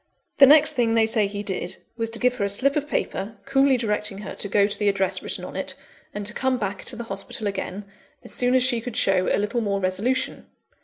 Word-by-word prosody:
The 275 Hz, -, +10 dB
next 300 Hz, +2 st, +6 dB
thing 230 Hz, -2 st, +1 dB
they 225 Hz, -1 st, +4 dB
say 220 Hz, -2 st, +1 dB
he 205 Hz, +1 st, -5 dB
did, 185 Hz, -3 st, -4 dB, 0.2 s
was 230 Hz, -1 st, -2 dB
to 230 Hz, -, +2 dB
give 250 Hz, +1 st, +1 dB
her -, -, -1 dB
a 200 Hz, -, 0 dB
slip 265 Hz, +8 st, +2 dB
of 295 Hz, -1 st, -1 dB
paper, 220 Hz, -6 st, -3 dB
coolly 270 Hz, -1 st, +3 dB
directing 210 Hz, -3 st, -1 dB
her -, -, -6 dB
to -, -, -2 dB
go 200 Hz, 0 st, +3 dB
to 205 Hz, -, 0 dB
the 205 Hz, -, +3 dB
address 195 Hz, -1 st, 0 dB
written -, -, -4 dB
on -, -, -9 dB
it, -, -, -4 dB, 0.4 s
and 205 Hz, -1 st, -5 dB
to 210 Hz, -, -1 dB
come 260 Hz, +1 st, 0 dB
back 200 Hz, -3 st, -4 dB
to -, -, +1 dB
the 235 Hz, -, -5 dB
hospital 200 Hz, 0 st, -6 dB
again, 195 Hz, 0 st, -4 dB, 0.4 s
as -, -, -6 dB
soon 250 Hz, +1 st, +2 dB
as 255 Hz, -, +4 dB
she 245 Hz, -3 st, +1 dB
could 235 Hz, -1 st, -6 dB
show 185 Hz, -1 st, +2 dB
a -, -, +2 dB
little 210 Hz, +4 st, -1 dB
more 200 Hz, -2 st, -1 dB
resolution. 200 Hz, +8 st, -1 dB
220 Hz, 245 wpm, -24 LUFS, 200-250 Hz, 0.4 s, The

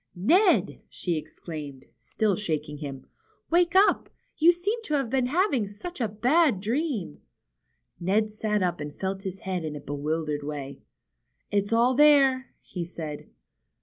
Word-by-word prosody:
^^Ned!" 355 Hz, -, +3 dB
she 175 Hz, -2 st, -2 dB
exclaimed, 150 Hz, -3 st, -7 dB
still 185 Hz, -, -1 dB
shaking 155 Hz, -6 st, -3 dB
him. 135 Hz, -3 st, -7 dB, 0.5 s
^^Wake 345 Hz, +1 st, +3 dB
up! 395 Hz, +2 st, +4 dB, 0.3 s
You 330 Hz, +3 st, +6 dB
seem 400 Hz, +7 st, -2 dB
to 290 Hz, -5 st, 0 dB
be 255 Hz, +2 st, 0 dB
having 285 Hz, -, +1 dB
such 265 Hz, -, -8 dB
a 230 Hz, -, +2 dB
bad 250 Hz, -, +2 dB
dream." 225 Hz, -, -2 dB, 0.8 s
Ned 210 Hz, +5 st, +1 dB
sat 210 Hz, -1 st, -1 dB
up 175 Hz, -4 st, -1 dB
and 150 Hz, 0 st, -7 dB
felt 190 Hz, 0 st, -2 dB
his 190 Hz, -1 st, -6 dB
head 185 Hz, -2 st, -3 dB
in 155 Hz, -1 st, -4 dB
a -, -, -5 dB
bewildered 150 Hz, +1 st, -3 dB
way. 145 Hz, -1 st, -6 dB, 0.7 s
It's 205 Hz, 0 st, 0 dB
all 235 Hz, +3 st, +4 dB
there," 270 Hz, -2 st, +5 dB
he 180 Hz, -, -5 dB
said. 160 Hz, -3 st, -7 dB
205 Hz, 145 wpm, -26 LUFS, -, 0.8 s, You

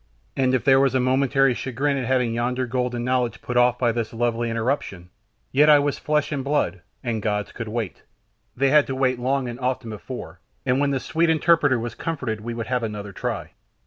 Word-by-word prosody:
And 130 Hz, -1 st, +2 dB
if 130 Hz, -, 0 dB
there 135 Hz, -1 st, +5 dB
was 135 Hz, -1 st, +2 dB
a -, -, +4 dB
momentary 135 Hz, +1 st, +3 dB
chagrin 135 Hz, +4 st, -1 dB
at 135 Hz, -2 st, -2 dB
having 125 Hz, -2 st, +1 dB
yonder 125 Hz, +2 st, -1 dB
golden 125 Hz, -1 st, -2 dB
knowledge 125 Hz, -1 st, 0 dB
put 125 Hz, -, -5 dB
off 120 Hz, 0 st, +4 dB
by 120 Hz, -2 st, +2 dB
this 115 Hz, -1 st, -3 dB
lovely 120 Hz, 0 st, 0 dB
interruption, 115 Hz, -6 st, -2 dB, 0.4 s
yet 150 Hz, +3 st, +5 dB
I 150 Hz, -, +8 dB
was 145 Hz, 0 st, 0 dB
flesh 150 Hz, 0 st, 0 dB
and 140 Hz, -3 st, -2 dB
blood, 130 Hz, -11 st, 0 dB, 0.2 s
the 115 Hz, -3 st, -1 dB
gods 105 Hz, -1 st, -2 dB
could 115 Hz, -2 st, -6 dB
wait 110 Hz, -5 st, -4 dB, 0.6 s
they 135 Hz, +1 st, +3 dB
had 150 Hz, -1 st, +5 dB
to 135 Hz, -, -3 dB
wait 130 Hz, -2 st, +1 dB
long 130 Hz, +1 st, 0 dB
and 120 Hz, 0 st, -6 dB
often 125 Hz, -3 st, -2 dB
before, 105 Hz, -5 st, -8 dB, 0.3 s
and 130 Hz, 0 st, +2 dB
when 145 Hz, 0 st, +2 dB
this 135 Hz, -3 st, -2 dB
sweet 165 Hz, +1 st, +1 dB
interpreter 160 Hz, -4 st, +3 dB
was 120 Hz, 0 st, -4 dB
comforted 130 Hz, -10 st, -3 dB
we 115 Hz, +1 st, -5 dB
would 115 Hz, -1 st, -4 dB
have 125 Hz, -1 st, -1 dB
another 105 Hz, -3 st, -5 dB
try. -, -, -4 dB
125 Hz, 210 wpm, -23 LUFS, 115-135 Hz, 0.6 s, I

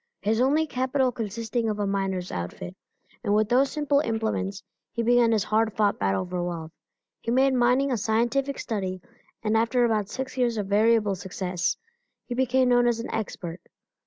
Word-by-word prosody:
His 220 Hz, +3 st, +1 dB
only 295 Hz, +5 st, +3 dB
capital 260 Hz, -1 st, 0 dB
consisting 225 Hz, 0 st, -2 dB
of 210 Hz, -, -2 dB
a 205 Hz, -, -1 dB
miner's 195 Hz, -2 st, -2 dB
outfit, 90 Hz, -, -5 dB, 0.5 s
and 205 Hz, -2 st, +2 dB
with 215 Hz, 0 st, +2 dB
those 265 Hz, +3 st, +4 dB
simple 295 Hz, -2 st, +1 dB
implements 220 Hz, -6 st, -2 dB, 0.3 s
he 235 Hz, -, -2 dB
began 240 Hz, 0 st, +4 dB
his 215 Hz, -3 st, +2 dB
hard 220 Hz, 0 st, +1 dB
fought 205 Hz, -2 st, +2 dB
battle 95 Hz, -, 0 dB
for 180 Hz, -1 st, -3 dB
wealth. 165 Hz, -2 st, -5 dB, 0.5 s
He -, -, -6 dB
made 265 Hz, +3 st, +3 dB
mining 255 Hz, +2 st, +3 dB
a 245 Hz, -, +1 dB
scientific 240 Hz, +6 st, 0 dB
study 190 Hz, -4 st, -3 dB, 0.4 s
and 215 Hz, 0 st, +1 dB
after 230 Hz, +2 st, +3 dB
about 215 Hz, -3 st, 0 dB
six 260 Hz, +2 st, -5 dB
years 240 Hz, -2 st, +1 dB
of 205 Hz, -, -1 dB
variable 210 Hz, +1 st, +3 dB
success, 180 Hz, -1 st, -2 dB, 0.5 s
he 245 Hz, -, -4 dB
became 255 Hz, 0 st, +2 dB
known 245 Hz, 0 st, +4 dB
as 235 Hz, -1 st, +1 dB
an 230 Hz, -, -5 dB
expert. 180 Hz, -5 st, -4 dB
225 Hz, 175 wpm, -26 LUFS, 200-250 Hz, 0.5 s, those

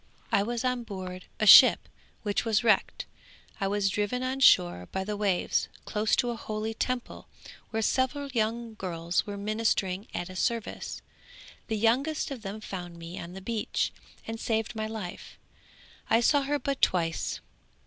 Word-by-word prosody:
I 200 Hz, -, +4 dB
was 235 Hz, +4 st, -2 dB
on 250 Hz, -1 st, 0 dB
board 185 Hz, -4 st, -7 dB
a 215 Hz, -, +2 dB
ship -, -, +9 dB, 0.4 s
which 205 Hz, -2 st, 0 dB
was 225 Hz, -1 st, +1 dB
wrecked; 225 Hz, -, +2 dB, 0.5 s
I 195 Hz, -, 0 dB
was 200 Hz, 0 st, +1 dB
driven 210 Hz, +6 st, -1 dB
on 260 Hz, +1 st, -2 dB
shore 90 Hz, -, +5 dB
by 190 Hz, -, -2 dB
the 210 Hz, +2 st, -3 dB
waves 200 Hz, -3 st, 0 dB, 0.2 s
close 215 Hz, 0 st, +1 dB
to 245 Hz, -2 st, +1 dB
a -, -, -4 dB
holy 215 Hz, 0 st, -4 dB
Temple 250 Hz, +2 st, -3 dB, 0.4 s
where 225 Hz, 0 st, -1 dB
several 265 Hz, +5 st, 0 dB
young 230 Hz, -1 st, -1 dB
girls 175 Hz, -2 st, -2 dB
were 205 Hz, -1 st, -5 dB
ministering 205 Hz, -2 st, -1 dB
at 175 Hz, -, -4 dB
a 185 Hz, -, -10 dB
service; 230 Hz, +3 st, -2 dB, 0.6 s
the 220 Hz, -, -1 dB
youngest 265 Hz, +9 st, +1 dB
of 260 Hz, -4 st, -6 dB
them 210 Hz, +1 st, -6 dB
found 175 Hz, -4 st, -7 dB
me 170 Hz, +1 st, -8 dB
on 170 Hz, +1 st, -8 dB
the 190 Hz, -, -8 dB
beach 220 Hz, +2 st, -2 dB, 0.3 s
and 225 Hz, 0 st, -5 dB
saved 225 Hz, -1 st, -1 dB
my 215 Hz, -1 st, -3 dB
life; 215 Hz, -5 st, -7 dB, 0.7 s
I 225 Hz, -, +5 dB
saw 285 Hz, +4 st, +4 dB
her 285 Hz, +2 st, 0 dB
but 275 Hz, -1 st, -3 dB
twice. 165 Hz, -3 st, +1 dB
215 Hz, 165 wpm, -28 LUFS, 190-235 Hz, 0.7 s, ship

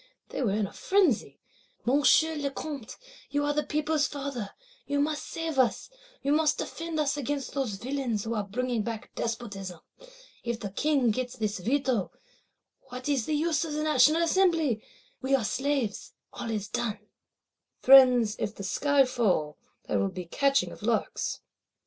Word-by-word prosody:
They -, -, -4 dB
were 215 Hz, -6 st, +1 dB
in 210 Hz, 0 st, +1 dB
a 195 Hz, -, -9 dB
frenzy: 375 Hz, -, +1 dB, 0.5 s
'Monsieur 290 Hz, +5 st, +4 dB
le 285 Hz, -2 st, -1 dB
Comte, 275 Hz, -4 st, -6 dB, 0.3 s
you 290 Hz, 0 st, 0 dB
are 290 Hz, -, +1 dB
the 300 Hz, -, +1 dB
people's 300 Hz, 0 st, 0 dB
father; 275 Hz, -7 st, -5 dB, 0.4 s
you 285 Hz, 0 st, 0 dB
must 300 Hz, +1 st, -1 dB
save 325 Hz, -4 st, -3 dB
us; 255 Hz, -, +1 dB, 0.3 s
you 280 Hz, -, +1 dB
must 305 Hz, 0 st, +3 dB
defend 330 Hz, -1 st, -4 dB
us 290 Hz, -1 st, +1 dB
against 285 Hz, 0 st, -3 dB
those 265 Hz, -7 st, -1 dB
villains 245 Hz, -1 st, -2 dB
who 230 Hz, -, -3 dB
are 210 Hz, -2 st, -1 dB
bringing 240 Hz, +3 st, -2 dB
back 220 Hz, 0 st, -5 dB
Despotism. 200 Hz, -6 st, -4 dB, 0.6 s
If 235 Hz, -1 st, -2 dB
the 200 Hz, -4 st, -5 dB
King 275 Hz, +1 st, +2 dB
get 250 Hz, +2 st, -3 dB
this 215 Hz, -2 st, -2 dB
Veto, 250 Hz, 0 st, 0 dB, 0.8 s
what 255 Hz, +1 st, -6 dB
is 275 Hz, -6 st, 0 dB
the 310 Hz, -, +1 dB
use 310 Hz, 0 st, +1 dB
of 315 Hz, -2 st, -4 dB
National 305 Hz, +1 st, +4 dB
Assembly? 330 Hz, -, +2 dB, 0.4 s
We 270 Hz, +1 st, +2 dB
are 250 Hz, -5 st, 0 dB
slaves, 265 Hz, -3 st, -1 dB, 0.2 s
all 230 Hz, -, -5 dB
is 210 Hz, -3 st, -2 dB
done.'" 220 Hz, -4 st, -3 dB, 0.7 s
Friends, 250 Hz, -5 st, +7 dB
if 215 Hz, 0 st, -2 dB
the 200 Hz, -, -7 dB
sky 280 Hz, +7 st, +3 dB
fall, 195 Hz, -12 st, 0 dB, 0.3 s
there 100 Hz, -, +1 dB
will 100 Hz, 0 st, +1 dB
be 180 Hz, -, -7 dB
catching 275 Hz, -, +1 dB
of -, -, -12 dB
larks! -, -, -1 dB
265 Hz, 160 wpm, -28 LUFS, 220-290 Hz, 0.8 s, Friends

